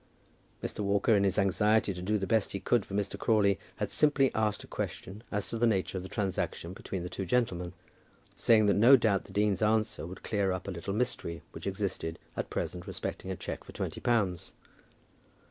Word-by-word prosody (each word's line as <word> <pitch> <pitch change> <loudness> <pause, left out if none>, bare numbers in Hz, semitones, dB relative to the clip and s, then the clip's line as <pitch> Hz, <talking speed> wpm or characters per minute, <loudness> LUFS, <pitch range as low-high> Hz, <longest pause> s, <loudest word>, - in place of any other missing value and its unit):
Mr. - - -4
Walker, 100 +2 +3
in 100 - +3
his 95 0 +1
anxiety 105 +1 +3
to 90 - -7
do 105 +4 +1
the 95 - -2
best 110 +2 +1
he 100 - -2
could 120 +2 +2
for 100 - -7
Mr. 100 -1 -2
Crawley, 100 -4 +3 0.2
had - - -3
simply 145 -3 +3
asked 110 -1 0
a - - -12
question 100 +3 -5
as 105 -1 -1
to 115 - -3
the 120 - +4
nature 95 -4 0
of 95 - -2
the 95 - -8
transaction 95 -3 -2
between 95 -1 -5
the - - -3
two 95 - -4
gentlemen, 90 -4 0 0.6
saying 110 -2 +4
that 100 - +4
no 120 +6 +8
doubt 110 -6 +2
the - - -13
dean's 100 -1 +1
answer 110 -4 +1
would 95 +1 -10
clear 100 -3 0
up 95 +1 -4
a - - -2
little 90 +2 -5
mystery 85 -8 -2
which - - -7
existed 95 -4 -2 0.2
at - - -3
present 90 0 -4
respecting 95 - -5
a 95 - -2
cheque - - -6
for - - -12
twenty - - -4
pounds. 100 -8 0
100 Hz, 205 wpm, -30 LUFS, 95-110 Hz, 0.6 s, no